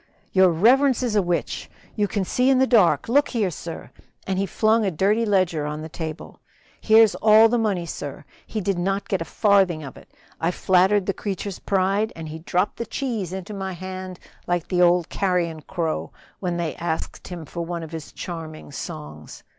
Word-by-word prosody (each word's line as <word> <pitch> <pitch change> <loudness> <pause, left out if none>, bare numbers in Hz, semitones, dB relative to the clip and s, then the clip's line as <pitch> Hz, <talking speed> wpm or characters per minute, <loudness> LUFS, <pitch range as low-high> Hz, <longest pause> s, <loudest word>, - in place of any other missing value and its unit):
"Your 185 -1 +5
reverence 255 - +4
is 235 -4 -1
a 205 - +5
witch 175 -2 -2 0.3
you 210 -2 +1
can 200 0 -2
see 250 +7 +2
in 270 - +5
the 260 - +4
dark 200 - +4
look 285 +5 +3
here, 215 -7 0
sir!" 165 +1 -8 0.3
and 190 -1 -1
he 195 - 0
flung 220 +2 +2
a 200 - +2
dirty 205 +7 +1
ledger 180 -7 +1
on 150 +1 -5
the 160 - -7
table. 160 -1 -7 0.4
"Here's 220 -1 +6
all 220 +1 +6
the 240 +1 +1
money, 200 -6 0
sir. 145 -3 -7 0.2
He 215 - -3
did 195 -1 -1
not 195 +3 -1
get 190 -3 -1
a - - -2
farthing 190 -7 +2
of 135 - -9
it. - - -16 0.3
I 165 - +1
flattered 190 +2 +3
the 195 - 0
creature's 200 -1 -4
pride, 195 +2 +1
and 160 -1 -7
he 160 +1 -7
dropped 180 +4 -1
the 235 - -4
cheese 225 -8 -3
into 190 +2 -6
my 190 -1 -4
hand 185 0 -7 0.3
like 175 -1 -1
the 180 -1 +2
old 175 -1 +4
carrion 175 -4 -1
crow 165 -1 -3 0.3
when 175 -2 -2
they 170 -2 -2
asked 165 -1 -4
him 175 -3 -7
for 170 +4 -5
one 170 0 -4
of 160 - -9
his 160 -2 -7
charming 160 -4 -7
songs. 75 - -8
185 Hz, 195 wpm, -23 LUFS, 170-210 Hz, 0.4 s, Here's